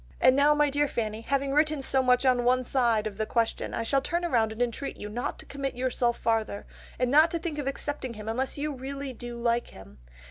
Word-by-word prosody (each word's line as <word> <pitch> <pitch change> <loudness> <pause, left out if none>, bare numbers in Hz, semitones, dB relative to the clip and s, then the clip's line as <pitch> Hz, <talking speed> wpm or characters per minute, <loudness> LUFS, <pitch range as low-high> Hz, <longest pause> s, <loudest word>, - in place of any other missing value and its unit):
And 255 - +5
now 290 +2 +5
my 295 -1 +3
dear 290 +1 +2
Fanny, 220 -4 -3
having 275 +3 -1
written 305 0 +2
so 265 0 +2
much 250 0 +3
on 250 -2 +3
one 255 +1 +3
side 235 -4 +1
of 210 -2 -5
the 215 - -2
question 230 -1 -1
I 230 - -1
shall 275 +4 +1
turn 345 +5 -2
round 235 -10 +2
and 220 - -9
entreat 245 +3 -2
you 210 - -6
not 240 +4 -3
to - - -9
commit 275 -2 -4
yourself 245 -1 0
farther, 220 -3 -1 0.3
and 250 0 0
not 310 +3 +6
to 335 - -2
think 325 -3 -4
of 280 - -3
accepting 275 -3 -3
him 210 0 -9
unless 255 +6 -2
you 295 +1 -2
really 275 +1 -6
do 240 0 -7
like 235 0 0
him. 70 -9 -14
255 Hz, 235 wpm, -27 LUFS, 230-280 Hz, 0.3 s, not